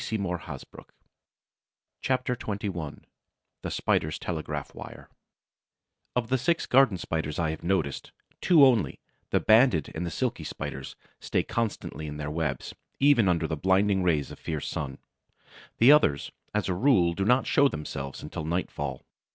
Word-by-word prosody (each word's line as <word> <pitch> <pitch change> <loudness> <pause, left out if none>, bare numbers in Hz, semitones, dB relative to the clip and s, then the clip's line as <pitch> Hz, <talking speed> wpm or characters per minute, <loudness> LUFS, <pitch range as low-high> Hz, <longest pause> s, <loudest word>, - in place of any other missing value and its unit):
CHAPTER 125 -1 0
XXI 100 -9 -5 0.6
THE - - -4
SPIDER'S 75 0 0
TELEGRAPH 80 -4 -4
WIRE - - -10 1.1
Of 120 -2 -1
the 130 - +2
six 165 +7 +1
Garden 125 -7 +4
Spiders 80 -2 -3
I 80 -2 0
have 80 - -7
noticed, 85 -6 -1 0.3
two 160 -6 +7
only, 120 -7 +2 0.3
the - - +2
Banded 110 - +4
and 80 - -3
the 85 - -2
Silky - - -2
Spiders, 65 0 -6 0.2
stay - - 0
constantly 110 -8 -3
in 75 0 -6
their 75 0 -4
webs, 75 -4 -3 0.3
even 135 -8 +5
under 85 -2 +1
the 80 - -2
blinding 95 +4 +2
rays 80 -6 +1
of - - -10
a - - -26
fierce 80 -3 -3
sun. 70 -2 -4 0.8
The 120 +5 +7
others, 75 - +3 0.2
as 105 -1 -1
a 95 - 0
rule, 90 -5 +3
do 95 - -2
not 125 +6 +3
show 140 - +4
themselves 70 - -6
until 75 +2 -5
nightfall. 75 -5 -3
90 Hz, 145 wpm, -27 LUFS, 75-115 Hz, 1.1 s, two